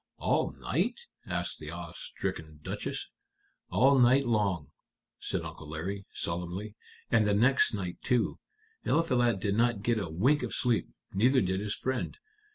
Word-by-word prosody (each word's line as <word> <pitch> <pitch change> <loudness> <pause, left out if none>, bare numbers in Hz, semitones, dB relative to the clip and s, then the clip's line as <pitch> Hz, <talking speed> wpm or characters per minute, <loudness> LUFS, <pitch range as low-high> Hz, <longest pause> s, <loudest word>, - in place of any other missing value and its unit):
"All - - +1
night?" - - -1 0.3
asked - - -2
the 75 - -7
awe 85 +1 -6
stricken 80 -1 -5
Duchess. - - -4 0.6
"All 135 +2 +5
night 130 +3 +5
long," 100 - +1 0.5
said - - -2
Uncle 75 - -8
Larry, 95 +6 -4
solemnly; 90 +5 -4 0.4
"and 110 -2 +4
the 100 - +3
next 125 +1 +4
night 90 -4 -4
too. 125 -4 +1 0.4
Eliphalet 120 -10 +2
did 100 +1 0
not 115 -1 +2
get 115 -1 +2
a 85 - -3
wink 125 - +3
of - - -3
sleep, 120 -4 +1 0.2
neither 125 +7 +4
did 95 -3 +1
his 105 +1 -2
friend. 130 -1 -2
105 Hz, 150 wpm, -30 LUFS, 90-120 Hz, 0.6 s, All